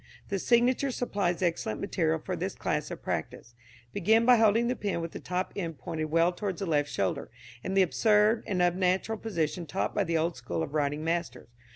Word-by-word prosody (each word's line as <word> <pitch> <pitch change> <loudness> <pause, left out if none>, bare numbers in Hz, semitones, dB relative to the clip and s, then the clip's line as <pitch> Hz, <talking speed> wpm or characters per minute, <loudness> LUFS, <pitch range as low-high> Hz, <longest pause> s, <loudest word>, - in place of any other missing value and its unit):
The 195 - -1
signature 245 +5 +3
supplies 200 -8 -1
excellent 165 -11 -1
material 80 +1 0
for - - -4
this - - -3
class - - -2
of - - -8
practice. 120 - -4 0.4
Begin 220 +4 +3
by 250 0 +7
holding 225 +1 +4
the 250 - 0
pen 200 -7 -2
with 165 0 -4
the - - -7
top 180 +1 -3
end 165 -5 -4
pointed 160 -2 -4
well 165 +3 +3
towards 190 0 -4
the 195 - -2
left 145 -4 +1
shoulder, 95 -2 -2 0.3
in 190 - -3
the 195 - +6
absurd 210 +4 +3
and 180 -3 +1
unnatural 185 +4 +1
position 170 -5 -2
taught 185 - -2
by 205 - +1
the 170 -3 0
old 165 +2 0
school 105 -10 -3
of 140 - -6
writing 145 0 0
masters. 165 -8 -3
180 Hz, 200 wpm, -29 LUFS, 160-210 Hz, 0.4 s, by